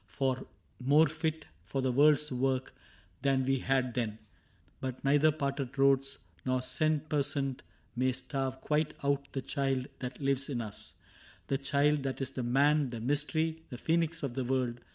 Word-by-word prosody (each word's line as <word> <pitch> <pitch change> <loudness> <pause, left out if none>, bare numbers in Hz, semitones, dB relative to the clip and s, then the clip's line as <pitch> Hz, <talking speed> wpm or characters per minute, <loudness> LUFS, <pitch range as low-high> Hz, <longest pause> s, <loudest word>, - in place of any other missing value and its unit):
More 145 +5 +5
fit 160 +1 -2 0.2
for 130 +9 -2
the 130 - +2
world's 150 +3 +4
work 130 +1 0 0.5
than 135 -2 +2
we 135 0 +2
had 130 -2 +1
then; 115 -3 -2 0.6
But 130 -1 -5
neither 145 +3 +5
parted 140 -2 -3
roads 135 0 +3 0.3
nor 130 0 0
cent 155 +2 0
per 150 -2 +2
cent 140 -2 -1 0.3
May 130 +1 +2
starve 130 0 -3
quite 150 0 0
out 140 0 0
the 135 - -3
child 135 -3 0
that 125 -1 -5
lives 135 0 0
in 130 -4 -1
us 110 -3 -5 0.3
— - - -25
The 135 - +1
Child 145 +1 +2
that 135 -1 -3
is 135 -1 -2
the 130 - -4
Man, 140 +3 +3
the 120 -1 -5
Mystery, 155 +5 0
The 125 - -6
Phcenix 165 +3 0
of 135 -4 -2
the 130 +1 -1
World. 125 -1 0
135 Hz, 170 wpm, -31 LUFS, 130-145 Hz, 0.6 s, More